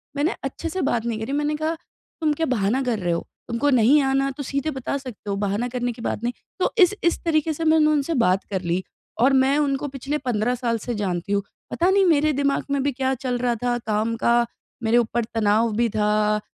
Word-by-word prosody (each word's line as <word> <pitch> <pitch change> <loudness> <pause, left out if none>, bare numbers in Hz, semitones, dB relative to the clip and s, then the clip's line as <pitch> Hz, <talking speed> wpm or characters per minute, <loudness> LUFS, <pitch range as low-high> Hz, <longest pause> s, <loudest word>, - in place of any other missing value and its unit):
मैंने 295 +4 0
अच्छे 300 +5 -4
से 375 +3 -3
बात 235 -1 -1
नहीं 225 -2 -2
करी 225 +5 -4
मैंने 300 +1 0
कहा 315 +2 -1 0.5
तुम 305 -1 +2
क्या 325 - +2
बहाना 215 +6 +1
कर 235 -4 -1
रहे 175 -2 -1
हो? 170 - -3 0.2
तुमको 240 +5 0
नहीं 260 +4 +5
आना 270 0 +1
तो 285 - -4
सीधे 280 +4 -2
बता 280 +2 -2
सकते 250 -6 -9
हो 200 - 0
बहाना 205 +5 -1
करने 245 0 -1
की 230 - -10
बात 230 - -3
नहीं। 240 +1 -1 0.3
तो - - +1
इस 360 +4 +3
इस 340 - +1
तरीके 315 -1 +1
से 325 - -4
मैंने 315 -1 +5
उनसे 300 +2 0
बात 185 +2 +2
कर 190 -2 -1
ली 185 +2 0 0.4
और 270 +2 +5
मैं 275 +2 +2
उनको 275 +1 -1
पिछले 285 +4 -2
15 235 +2 +1
साल 230 -1 +2
से 240 - -1
जानती 180 +1 -2
हूँ 200 -1 +1 0.3
पता 350 +2 +2
नहीं 390 0 +4
मेरे 310 -2 +3
दिमाग 280 0 +1
में 280 -1 +1
भी 285 - +1
क्या 265 +1 -1
चल 245 -1 0
रहा 240 -1 +1
था 240 0 +1
काम 220 +2 0
का 235 - +4 0.5
मेरे 225 +2 +3
ऊपर 235 0 +1
तनाव 220 +1 +2
भी 235 +1 +2
था, 210 0 +1
245 Hz, 230 wpm, -23 LUFS, 220-290 Hz, 0.5 s, नहीं